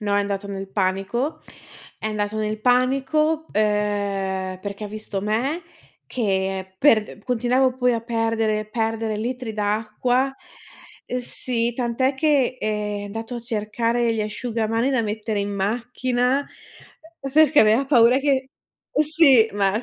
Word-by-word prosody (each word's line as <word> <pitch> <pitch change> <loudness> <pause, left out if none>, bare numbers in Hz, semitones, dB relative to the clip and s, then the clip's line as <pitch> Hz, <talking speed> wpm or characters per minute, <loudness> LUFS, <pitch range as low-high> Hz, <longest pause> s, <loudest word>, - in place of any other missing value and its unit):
No, 205 -1 0
è 205 - +3
andato 200 0 -3
nel 195 -1 -5
panico, 195 +9 -1 0.6
è 220 - -4
andato 210 0 -2
nel 215 0 -2
panico 275 +6 +2
ehm 205 -2 0 0.3
perché 200 +1 -6
ha - - -5
visto 210 -2 -5
me 250 - -1 0.4
che 190 -4 -2
per 220 -7 +3
continuavo 250 +2 +1
poi 250 -1 +2
a 230 - -1
perdere, 225 -2 0
perdere 225 -1 -1
litri 240 +1 -4
d'acqua. 220 +5 0 0.9
Sì, 240 -1 -2
tant'è 250 +2 0
che 270 -3 +2
ehm 210 -1 -2
è 205 - -6
andato 225 +4 -6
a 235 - -5
cercare 230 +1 0
gli 220 - -1
asciugamani 225 +3 -1
da 255 -3 +1
mettere 215 0 -2
in 200 - -2
macchina 245 +5 0 0.9
perché 310 -1 +6
aveva 220 +5 +4
paura 250 -2 +5
che, 270 -2 0 0.6
sì, 275 -8 +5
ma. 200 +3 +1
225 Hz, 130 wpm, -23 LUFS, 210-255 Hz, 0.9 s, perché